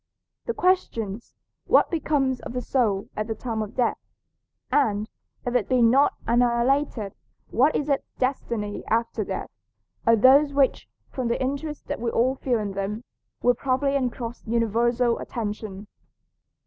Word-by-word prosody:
The 470 - -1
questions, 235 - 0 0.3
"What - - +4
becomes 280 -6 0
of - - -8
the 250 - -2
soul 215 -8 0
at 215 0 -2
the 225 - -3
time 225 -1 -3
of 210 -1 -6
death?" 245 -2 +1 0.7
and, 215 -7 +2 0.4
if 245 - -1
it 245 -4 +1
be 255 -2 +4
not 265 +5 +4
annihilated, 240 -1 +1 0.4
"What 265 +7 +3
is 290 - 0
its 280 -2 0
destiny 235 -5 -2
after 230 +1 0
death?" - - -5 0.6
are 230 - +7
those 275 +6 +6
which, 275 -2 +1 0.2
from 255 -3 -2
the 235 - 0
interest 280 +3 -3
that - - -4
we 235 - 0
all 245 +3 +2
feel 255 -2 0
in 210 -2 -3
them, 200 +4 -3 0.4
will 245 - +5
probably 275 +3 0
engross 245 -3 -3
universal 235 +1 +1
attention. 210 -3 -5
240 Hz, 150 wpm, -25 LUFS, 225-270 Hz, 0.7 s, are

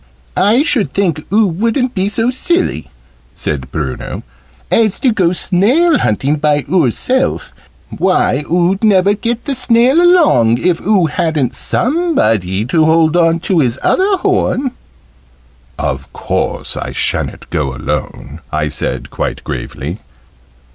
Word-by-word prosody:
"I 215 +9 +3
should 265 -10 0
think 170 -6 -1
oo 215 +2 +4
wouldn't 230 - -1
be 190 0 -1
so 225 +4 +1
silly," 260 - -1 0.5
said 65 -3 -3
Bruno, 70 -5 -5 0.5
"as 215 -4 +2
to 255 - +3
go 185 -6 +1
snail 245 - +2
hunting 135 +8 0
by 145 -1 +1
oor 160 -4 +2
self. 260 - -1 0.4
Why, 140 - +1
oo'd 180 +4 +1
never 200 -2 +4
get 230 +3 -3
the 285 - -1
snail 250 +4 +3
along, 305 - +4
if 175 +4 0
oo 195 -4 +2
hadn't 155 -4 -1
somebody 115 - 0
to 160 +6 +2
hold 160 0 +3
on 165 -1 +2
to 180 -1 +1
his 125 -4 +1
other 390 +1 +2
horn!" 265 -6 0 1.1
"Of 65 +1 -4
course - - -3
I - - -5
sha'n't - - -2
go 75 -6 -2
alone," 70 +4 -5
I 75 0 -1
said, 70 - -4
quite - - -4
gravely. 80 +10 -6
180 Hz, 135 wpm, -14 LUFS, -, 1.1 s, oo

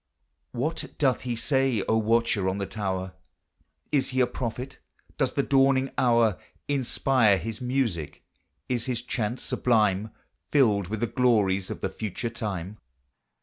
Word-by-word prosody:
What 150 +7 -3
doth 130 -4 +2
he 120 -1 -3
say, 130 -3 +1
O 110 - +3
watcher 110 -3 +2
on 95 - -2
the 100 - -2
tower? 95 -3 -3 0.8
Is 140 -3 +2
he 130 0 -1
a 125 - +5
prophet? 125 +1 -5 0.4
does 130 -3 +1
the 140 - +1
dawning 135 -1 +3
hour 115 -5 +3 0.3
Inspire 130 -5 +2
his 110 +3 -5
music? 125 - -1 0.4
Is 120 -2 -1
his 120 -2 -2
chant 120 -1 -2
sublime, 105 -3 +1 0.4
Filled 105 -10 +3
with 110 +3 -4
the - - +3
glories 105 -7 +2
of - - -6
the - - -1
future 110 +3 -4
time? 105 -3 -5
115 Hz, 145 wpm, -26 LUFS, 105-130 Hz, 0.8 s, a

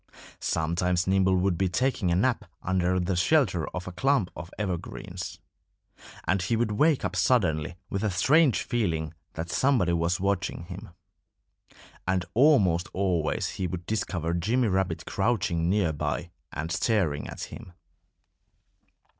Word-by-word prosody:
Sometimes 85 +2 0
Nimble 95 0 +3
would 90 -1 +1
be 95 -1 +2
taking 125 -2 0
a 85 - +2
nap 115 +3 +1 0.2
under 90 -1 +1
the 90 +1 0
shelter 90 - +2
of 90 0 -6
a - - -4
clump 120 0 +1
of 85 - -7
evergreens. 95 -5 -5 0.9
And 90 +1 +1
he 115 +5 0
would 115 -1 0
wake 150 +7 +2
up - - -2
suddenly 85 - +2 0.2
with 100 +2 -2
a 110 - +2
strange 135 - +3
feeling 80 -9 -1 0.2
that 85 +1 -5
somebody 120 - +2
was 85 +2 +1
watching 100 -3 -1
him. 95 +5 -9 1.2
And 95 -1 +1
almost 100 - +4
always 90 -5 0
he 95 - -3
would 90 -1 -5
discover 90 -6 -2
Jimmy 110 +8 +1
Rabbit 95 -1 -1
crouching 85 -7 0
near 95 -5 +2
by 75 - -3 0.2
and 80 +3 -4
staring 85 -5 +1
at - - -7
him. 90 - -10
95 Hz, 140 wpm, -27 LUFS, 85-110 Hz, 1.2 s, almost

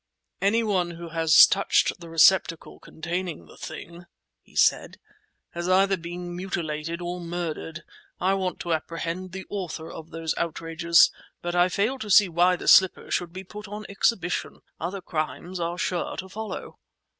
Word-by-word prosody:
"Any 215 +4 +3
one 190 -5 0
who 170 0 -8
has 160 -1 +7
touched 195 -1 +1
the 170 -1 -11
receptacle 165 0 +3
containing 170 - -5
the - - -16
thing," 170 +1 -9 0.3
he - - -24
said, - - +2 0.5
"has 175 +1 -4
either 195 +1 +4
been 175 0 -7
mutilated 170 -2 -4
or 175 +1 -4
murdered. 170 -1 -5 0.4
I 190 +2 +2
want 185 -3 -2
to 170 -2 -1
apprehend 165 +3 -4
the 190 +1 -7
authors 175 -5 -5
of 160 0 -9
those 165 -1 -3
outrages, 170 0 +3 0.3
but 175 0 -2
I 175 +1 +4
fail 220 +8 0
to 215 - -6
see 200 -1 +6
why 175 +2 +3
the - - -8
slipper 190 -1 +5
should 175 -2 -1
be 185 +2 -8
put 210 +2 -10
on 210 +1 -7
exhibition. 195 -3 -1 0.2
Other 185 +4 -4
crimes 155 +2 -4
are 170 +1 -2
sure 180 -1 -2
to 190 - -5
follow." 215 0 -7
175 Hz, 160 wpm, -25 LUFS, 165-190 Hz, 0.5 s, has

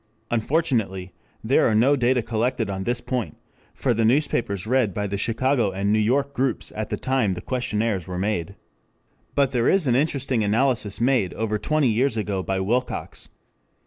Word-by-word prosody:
Unfortunately 110 - 0 0.3
there - - +3
are 110 - +2
no 130 +6 +4
data 125 -2 +2
collected 115 -1 -1
on 95 0 -4
this 120 0 0
point 120 - -4 0.4
for 130 - +1
the 115 0 0
newspapers 115 - +1
read 120 -5 +1
by 105 - -1
the 100 0 -3
Chicago 115 +3 +1
and 100 +2 -1
New 110 - +3
York 140 +6 +1
groups 130 -3 -2
at 110 0 -4
the - - -2
time 130 -8 0
the - - -6
questionnaires 110 -5 -2
were 90 -1 -5
made. 100 -1 -2 0.8
But 140 -2 +2
there 120 -3 +2
is 190 -4 +3
an 125 -3 +2
interesting 135 -4 0
analysis 110 0 +1
made 120 -6 +1
over 110 -1 -1
twenty 155 +3 +1
years 115 +2 +1
ago 100 -3 -1
by 95 +1 -2
Wilcox. 120 +7 -2
115 Hz, 175 wpm, -23 LUFS, 100-130 Hz, 0.8 s, no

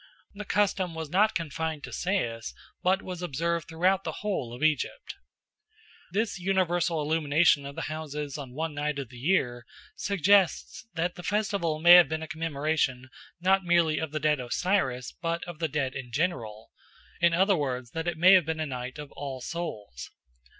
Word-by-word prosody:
The 205 +1 -7
custom 190 -4 0
was 160 -2 -5
not 210 +5 +3
confined 160 -2 -3
to - - -8
Sais, 120 - -2 0.3
but 190 +2 +2
was 180 -2 -6
observed 170 +1 -2
throughout 185 +4 +1
the - - -3
whole 165 - -2
of 125 +5 -7
Egypt. 155 - 0 1.0
This 205 -1 -1
universal 175 -3 +1
illumination 150 -1 +3
of 140 - -9
the - - -4
houses 150 -2 -5
on 135 -4 -7
one 160 +1 -2
night 145 0 -2
of 135 -4 -5
the 125 -1 -12
year 125 -6 +1 0.3
suggests 200 +2 +2
that 175 +2 -1
the 180 - -9
festival 195 -4 0
may 170 +2 +6
have 175 -5 +8
been 160 0 -3
a - - -6
commemoration 150 -5 -1 0.3
not 190 +2 +3
merely 170 -3 +3
of 160 - -3
the 155 - -2
dead 150 -1 +2
Osiris 130 -1 -1
but 170 -1 -1
of 175 -3 -8
the 165 - 0
dead 135 -2 -1
in 130 -3 -7
general, 115 -8 -2 0.5
in 170 -1 +4
other 190 +3 +4
words, 130 -6 -3
that 165 +1 -4
it 175 -2 -1
may 185 +4 +7
have 185 -4 +6
been 160 0 -2
a 155 - -1
night 130 -1 -5
of 150 -1 -8
All 135 -2 -6
Souls. 105 - -6
160 Hz, 180 wpm, -28 LUFS, 140-180 Hz, 1.0 s, have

